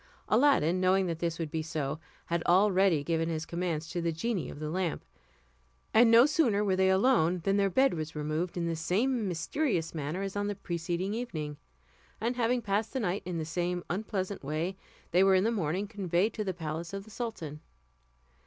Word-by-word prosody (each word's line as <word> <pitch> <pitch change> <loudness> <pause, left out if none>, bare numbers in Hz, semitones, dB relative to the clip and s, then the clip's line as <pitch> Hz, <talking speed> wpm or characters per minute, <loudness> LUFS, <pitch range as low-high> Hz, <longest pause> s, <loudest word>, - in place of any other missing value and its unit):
Aladdin, 215 - +3
knowing 190 +1 +3
that 165 -2 -3
this 170 -1 -1
would 160 -3 -4
be 160 -1 -1
so, 155 -2 -3 0.3
had 170 0 -1
already 185 -3 +4
given 165 +1 0
his 160 -1 -2
commands 170 -2 -2
to 175 - -3
the 170 0 0
genie 190 +3 -2
of - - -9
the 155 0 -4
lamp; 180 -2 -2 0.9
and 230 +1 +7
no 230 +2 +8
sooner 280 - +2
were 190 -2 +2
they 190 0 +3
alone 190 -4 +3
than 195 +2 +2
their 200 -1 +3
bed 265 +7 +3
was 155 -1 -5
removed 155 +4 -2
in 170 - -1
the 165 0 -1
same 210 +8 0
mysterious 180 - -1
manner 155 +4 -3
as 195 0 -4
on 205 0 -1
the 205 - -2
preceding 175 +1 -3
evening; 155 -11 -4 0.6
and 235 +3 -1
having 240 0 +1
passed 205 +1 -1
the 265 - -1
night 200 -3 -1
in 180 -1 -3
the 160 - -2
same 175 +2 -2
unpleasant 195 -1 -3
way, 155 +6 -2 0.4
they 180 +2 +5
were 195 0 +5
in 185 - +3
the 225 - +2
morning 190 -1 -1
conveyed 200 0 0
to 215 - -3
the 195 - -1
palace 165 0 -5
of 195 0 -4
the 220 - -15
sultan. 185 - -5
185 Hz, 200 wpm, -30 LUFS, 165-205 Hz, 0.9 s, no